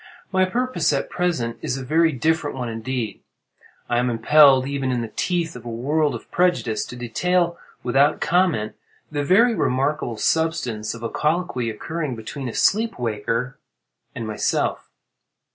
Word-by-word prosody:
My 185 -1 +3
purpose 185 -6 0
at 140 - -2
present 160 -11 -1
is 125 - -2
a 130 - -6
very 160 +4 +3
different 155 +2 0
one 125 -2 -3
indeed. 115 -1 -4 0.7
I 120 0 +1
am 125 0 +1
impelled, 130 +3 +6
even 135 -1 -2
in 125 -1 0
the 115 -2 -6
teeth 170 -2 -1
of 125 - -9
a 120 - -6
world 145 +6 0
of - - -10
prejudice, 170 -12 +1
to - - -9
detail 170 +9 0 0.2
without 140 +4 +3
comment 165 -11 +1 0.4
the 145 -1 -1
very 225 +10 +5
remarkable 135 - 0
substance 125 -7 0
of 115 - -10
a 115 - -2
colloquy, 150 -7 0
occurring 150 +5 -4
between 125 +4 -6
a - - -7
sleep 225 +3 +2
waker 115 +3 -2 0.6
and 115 - -4
myself. 110 -1 -1
135 Hz, 155 wpm, -22 LUFS, 120-165 Hz, 0.7 s, impelled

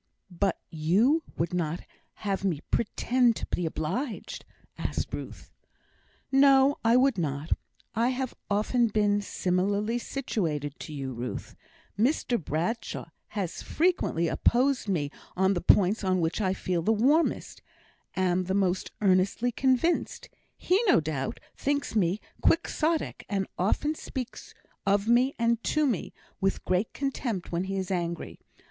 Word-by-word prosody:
"But 190 +3 0
you 195 - +3 0.2
would 170 +2 -1
not 170 -1 -1 0.4
have 195 -1 -1
me 170 -7 0
pretend 240 +1 +2
to - - -4
be 175 - -1
obliged?" 215 - -4 0.3
asked - - -3
Ruth. - - -7 0.8
"No, 275 0 +5
I 230 +2 +5
would 265 -5 +3
not. 145 0 -3 0.4
I 230 +3 +2
have 260 0 -2 0.2
often 215 +4 +2
been 205 -1 +2
similarly 200 +4 0
situated 160 - -3
to - - -7
you, 135 -3 -4
Ruth; 120 +1 -5 0.4
Mr 240 - +1
Bradshaw 175 +11 -2 0.3
has 185 -4 -2
frequently 320 - +1
opposed 250 - +2
me 150 -7 0 0.3
on 190 +1 +3
the 175 - -2
points 205 +3 +4
on 185 -1 +2
which 165 +4 0
I 190 -1 +1
feel 180 -2 -1
the 210 - +2
warmest 275 +10 +2 0.5
am 185 -1 +1
the 190 +2 -1
most 190 -2 +1
earnestly 195 +5 +3
convinced. 265 +7 +1 0.3
He, 375 +4 +2
no 360 - +6
doubt, 150 -4 -3 0.2
thinks 285 -3 -1
me 190 -1 +2 0.2
Quixotic, 325 -1 +1
and 195 -2 0
often 255 - +1
speaks 260 -5 -7 0.3
of 200 +1 +2
me, 250 +4 +4
and 230 0 +1
to 305 0 +2
me, 235 - -1 0.3
with 195 0 0
great 185 +4 +1
contempt 245 -9 -3
when 175 +2 -1
he 195 0 -3
is 190 0 -3
angry. 170 -2 -3
200 Hz, 140 wpm, -28 LUFS, 180-250 Hz, 0.8 s, no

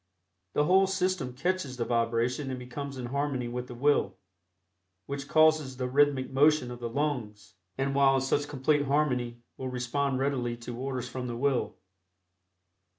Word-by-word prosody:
The 150 - +3
whole 190 +4 +4
system 185 -8 -1
catches 160 -3 -1
the 120 - -1
vibration 120 +4 0
and 130 - -3
becomes 135 +2 -6
in 125 - -4
harmony 135 -1 -1
with 125 +1 -4
the 125 - -8
will, 125 -7 +2 0.9
which 140 0 -5
causes 155 -4 +3
the 125 -1 -2
rhythmic 135 0 +2
motion 145 -1 +3
of 120 - -7
the 120 -1 -4
lungs, 120 -6 -3 0.2
and 135 +1 0
while 135 -1 +5
in 135 - +2
such 145 +2 0
complete 145 +1 +1
harmony 125 -5 0
will 130 - -4
respond 130 +2 -1
readily 130 -3 -1
to 120 0 -7
orders 130 0 -3
from 125 0 -5
the 120 -1 -4
will. 135 0 0
135 Hz, 160 wpm, -29 LUFS, 125-145 Hz, 0.9 s, while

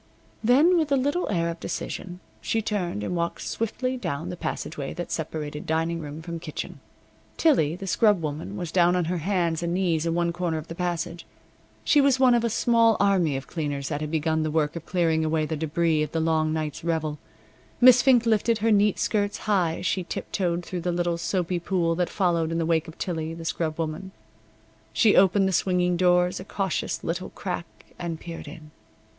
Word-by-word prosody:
Then, 290 +10 +5
with 310 -3 -1
a - - +5
little 285 +7 0
air 170 -4 0
of 165 0 -5
decision, 180 +2 -5 0.2
she 225 - 0
turned 190 - -2
and 180 - -2
walked 170 0 -2
swiftly 255 +3 -2
down 165 - -4
the 180 - -4
passageway 150 -4 -4
that 175 0 -5
separated 150 -2 -4
dining 165 +1 0
room 150 0 -7
from 170 0 -5
kitchen. - - -6 0.6
Tillie, 210 - +3
the 195 - -7
scrub 205 0 +3
woman, 160 +5 -5
was 175 -4 -4
down 175 0 +4
on 180 -2 +1
her 175 +1 -1
hands 170 -2 0
and 170 0 -1
knees 170 -4 +1
in 165 - 0
one 170 0 +1
corner 175 -2 -1
of 155 +1 -7
the - - -4
passage. 170 -1 -3 0.6
She 295 - +4
was 275 -2 +3
one 255 -2 +6
of 235 -1 +2
a 235 - +1
small 230 0 +3
army 185 -8 +2
of 135 - -7
cleaners 145 -4 -3
that 145 -1 -3
had 155 - -3
begun 160 0 0
the 155 - -1
work 150 0 0
of 170 -1 -7
clearing 165 -3 +1
away 155 0 +1
the 160 - -3
debris 160 +1 +1
of 150 -1 -3
the 165 - 0
long 160 -1 +1
night's 155 -2 -3
revel. 160 -3 -1 0.6
Miss 250 0 +8
Fink 250 -3 +4
lifted 230 0 +2
her 225 +1 +1
neat 205 -1 +3
skirts 205 -1 0
high 180 -6 +1
as - - -6
she 185 - 0
tip - - -6
toed 175 -2 -1
through 180 -2 -4
the 175 +1 -1
little 175 -1 -1
soapy 175 +1 -1
pool 170 -1 0
that 175 +1 -1
followed 170 -4 +1
in 165 - -1
the 165 - 0
wake 165 0 +1
of 160 - -11
Tillie, 165 -2 -3
the 165 0 -8
scrub 160 -1 -2
woman. 165 +4 -4 0.8
She 210 - +4
opened 195 +1 +5
the - - 0
swinging 180 0 +2
doors 180 0 +3
a - - -6
cautious 195 -1 -2
little 175 +3 -3
crack 180 -3 -5 0.3
and 170 -2 -4
peered 165 -2 -8
in. 155 0 -11
170 Hz, 205 wpm, -25 LUFS, 160-195 Hz, 0.8 s, Miss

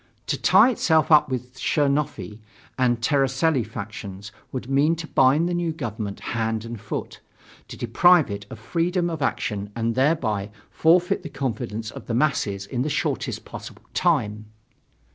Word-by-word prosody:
To - - 0
tie 260 - +5
itself 160 -9 +2
up 150 -3 +6
with 125 -1 -4
the - - -16
Chernofi 140 - 0 0.4
and 120 -2 +1
Tseretelli 135 +1 +2
factions 100 -1 -8 0.2
would 125 -2 -5
mean 140 +5 +3
to 165 0 -6
bind 145 +3 +3
the 175 - -1
new 175 -1 0
government 110 -9 -5
hand 110 -1 -1
and 115 -3 -7
foot - - -5 0.5
to - - -9
deprive 160 - +4
it 100 0 -6
of - - -8
freedom 170 - -1
of 160 -2 -5
action 105 -6 -2
and 115 0 0
thereby 115 -7 +1 0.2
forfeit 175 +3 +3
the 170 - -7
confidence 115 -5 -4
of - - -10
the 115 - -1
masses 110 -8 0
in 120 +4 -3
the 145 - -1
shortest - - -2
possible - - -10
time. 110 -11 0
130 Hz, 160 wpm, -24 LUFS, 110-155 Hz, 0.5 s, up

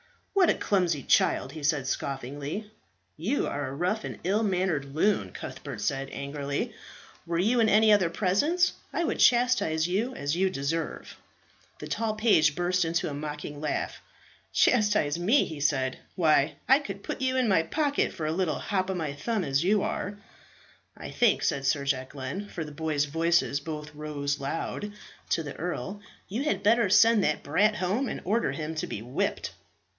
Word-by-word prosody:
"What 380 -3 +4
a - - +4
clumsy 175 -8 0
child!" 130 - +2
he 155 +1 -8
said 145 -2 +1
scoffingly. 140 - -4 0.5
"You 210 - 0
are 145 -1 -3
a 135 - -6
rough 185 +8 -1
and - - -6
ill 200 +5 +1
mannered 180 -9 -1
loon," 205 +6 +1
Cuthbert 140 -7 -7
said 135 +6 -1
angrily. 140 0 -3 0.5
"Were 170 0 -1
you 225 +8 +2
in 225 -1 +4
any 215 +1 +5
other 190 -5 +3
presence 255 - +2 0.2
I 340 - -1
would - - -1
chastise 240 -10 +3
you 220 +8 -1
as 145 +2 -1
you 190 +2 +2
deserve." 165 0 -3 0.6
The - - -8
tall 225 -1 -1
page 160 -9 +4
burst 180 +1 +1
into 165 +1 0
a 145 - -4
mocking 150 0 -6
laugh. 150 - -2 0.5
"Chastise 210 -10 +3
me!" 220 +11 +3
he 155 -2 -7
said. 135 -3 0 0.2
"Why, 155 -4 +3
I 270 +2 +6
could 200 -8 -7
put - - -5
you 260 0 +1
in 255 -2 +2
my 190 -5 +4
pocket 285 - 0
for 155 - -5
a 155 - 0
little 170 -2 0
hop 190 -2 -1
of 190 - -1
my 155 -4 -2
thumb 205 +8 -2
as 140 0 +1
you 200 +2 +3
are." 205 -1 -3 0.8
"I - - -7
think," 240 -4 +3
said 140 - 0
Sir 140 0 +1
Jacquelin 135 +8 -3
for 160 - -5
the 150 - -9
boys' 150 -1 -1
voices 165 -1 +1
both 150 0 -7
rose 145 -1 -3
loud 165 +8 -4 0.4
to 165 - +1
the 145 -2 -7
earl, 185 +4 -4 0.3
"you 225 +8 -2
had 200 -9 0
better 225 0 +4
send 215 +1 +6
that 155 - 0
brat 210 +9 +2
home 210 +8 0
and - - -4
order 220 +6 +1
him 155 0 -4
to 155 - -3
be 105 - -5
whipped." 125 +3 -2
170 Hz, 180 wpm, -28 LUFS, 145-210 Hz, 0.8 s, I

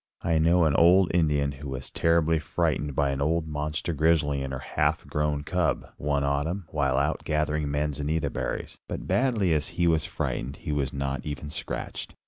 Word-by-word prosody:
I 80 -1 +2
know 85 +2 +4
an 75 - +3
old 90 +3 +5
Indian 75 -4 +2
who 70 0 -8
was 65 -1 -5
terribly 80 -1 +2
frightened 75 -1 -1
by 70 0 +2
an 70 0 -3
old 80 +2 +1
monster 75 +2 -2
grizzly 75 -2 +2
and 70 0 -4
her 65 - -3
half 65 - 0
grown 75 -1 -1
cub, 80 -3 -1
one 70 -1 0
autumn, 75 +7 -1
while 70 -4 +1
out 75 +3 0
gathering 75 -1 0
manzanita 75 +2 -1
berries. 65 -2 -4
But - - -5
badly 115 -9 +2
as 75 -2 0
he 85 - +3
was 80 -2 +2
frightened, 65 +3 -3
he 75 - -5
was 70 -2 0
not 70 -1 -3
even 75 0 -5
scratched. - - -5
75 Hz, 180 wpm, -27 LUFS, 70-80 Hz, -, old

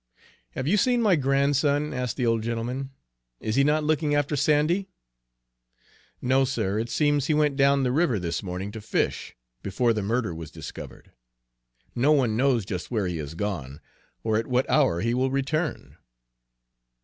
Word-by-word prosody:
"Have 130 - -4
you 200 +6 +3
seen 245 +3 +2
my 200 -5 +4
grandson?" 145 +1 +1
asked 125 -3 -3
the 125 - 0
old 115 -1 +2
gentleman. 120 +4 -3 0.5
"Is 110 - -3
he 140 - +4
not 150 +2 +2
looking 150 -1 +1
after 145 0 0
Sandy?" 155 +7 +2 1.4
"No, 130 +2 +3
sir. 110 -6 -1
It 115 +1 -3
seems 145 0 +1
he 155 - +2
went 150 -2 +2
down 140 0 +3
the 125 - +1
river 140 -4 +2
this 85 -3 -3
morning 95 +1 -5
to 110 0 -8
fish, 105 - -2 0.3
before 115 +5 +1
the 110 - -2
murder 110 -1 -1
was 80 -2 -8
discovered; - - -10 0.8
no 130 +5 +2
one 125 -7 +2
knows 125 -3 +2
just 90 -2 -5
where 110 -5 -1
he 90 -2 -2
has 75 0 -6
gone, 80 -8 -4 0.4
or 110 -1 +1
at 115 - -2
what 125 0 +1
hour 130 - +2
he 115 +2 0
will 130 +2 +1
return." 145 +4 -2
130 Hz, 170 wpm, -25 LUFS, 110-145 Hz, 1.4 s, my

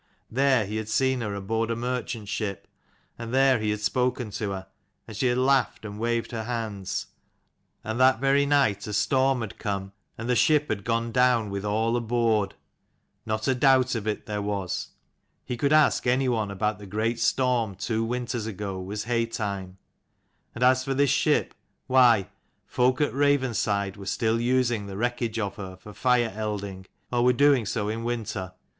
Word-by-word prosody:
There 130 -3 +3
he 105 +2 -4
had 110 0 -4
seen 130 +3 +1
her 105 -3 -3
aboard 110 +3 -2
a 115 - 0
merchant 120 -2 -3
ship, 100 -1 -4 0.5
and 115 -1 -6
there 135 -1 +4
he 110 0 -1
had 105 0 -2
spoken 125 0 0
to 100 0 -3
her, 95 -1 -5 0.4
and 110 - -9
she 125 +5 +1
had 120 0 +1
laughed 130 -3 +2
and 105 0 -7
waved 115 +1 -1
her 115 -2 -4
hands. 110 -5 -3 0.8
And 110 +2 -3
that 130 -2 +5
very 140 +1 +3
night 120 -9 +2
a 105 - -4
storm 130 +3 +2
had 110 -4 -7
come, 100 -2 -3 0.3
and 115 - -5
the 125 - +2
ship 150 +3 +3
had 100 -1 -3
gone 115 0 0
down 125 -4 +3
with 100 0 -3
all 110 +3 0
aboard: 115 -4 +1 0.7
not 110 0 -1
a 135 - +4
doubt 130 0 +4
of 110 -3 -3
it 105 - -2
there 105 -1 -3
was; 100 -3 -3 0.6
he 125 - -3
could 140 +4 0
ask 155 -4 +4
any 130 +2 +2
one 110 -4 0
about 105 +1 -1
the 100 - -10
great 110 +4 -1
storm 120 -4 +1
two 110 +3 -1
winters 120 -1 -3
ago 100 -3 -5
was 105 +3 -4
haytime; 105 -5 -2 0.8
and 120 - -2
as 130 0 +4
for 135 0 -2
this 140 -1 +3
ship, - - +2 0.3
why 120 -6 +5 0.4
folk 125 +3 +1
at 145 - +1
Ravenside 120 -8 +1
were 100 -1 -9
still 115 +2 0
using 120 -4 +1
the 95 -1 -7
wreckage 120 0 -1
of 100 -3 -3
her 95 -2 -7
for 105 +3 -13
fire 120 -2 +2
elding, 100 -3 -4 0.2
or 120 -1 +2
were 125 0 +5
doing 135 -3 +4
so 105 -2 -1
in 110 +2 -3
winter. 110 -6 -3
115 Hz, 180 wpm, -26 LUFS, 105-125 Hz, 0.8 s, that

